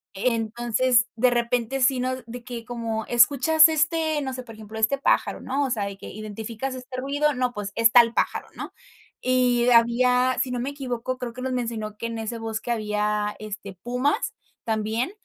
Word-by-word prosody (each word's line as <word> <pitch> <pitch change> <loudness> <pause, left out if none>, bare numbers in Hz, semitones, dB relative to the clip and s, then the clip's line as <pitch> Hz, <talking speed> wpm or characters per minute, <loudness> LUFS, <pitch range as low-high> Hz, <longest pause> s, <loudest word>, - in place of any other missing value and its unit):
entonces, 235 +2 +1
de 245 +2 +3
repente, 240 +2 0
sí 260 0 +3
nos 255 0 -2
de 240 +1 -8
que 235 -2 -7
como: 230 -2 -3
"¿Escuchas 280 +6 +6
este, 315 -1 +1
no 265 -1 -3
sé, 255 0 -6
por 225 - -11
ejemplo, 220 0 -10
este 220 +6 +2
pájaro?", - - +1
¿no?, 275 +2 -1
o - - -2
sea, 215 -4 0
de 200 -1 -6
que: 200 - -10
"¿identificas 220 +4 -5
este 255 0 -8
ruido?, 290 +2 +1
no, 250 -1 0
pues, 205 -1 -5
es 230 -1 +4
tal 235 -1 +6
pájaro", - - -1
¿no? - - -7 0.5
Y 250 -1 +3
había, 250 +2 +4
si 255 - -2
no 245 - -2
me 255 - -2
equivoco, 255 -2 -4
creo 245 -2 -5
que 255 - -8
nos 260 0 -2
mencionó 225 -3 -3
que 230 - -5
en 230 -1 -5
ese 225 +1 -4
bosque 225 +1 -5
había, 210 -1 -1
este, 205 -2 -7
pumas, 250 - -1 0.3
también, 220 - -1
240 Hz, 190 wpm, -24 LUFS, 220-255 Hz, 0.5 s, Escuchas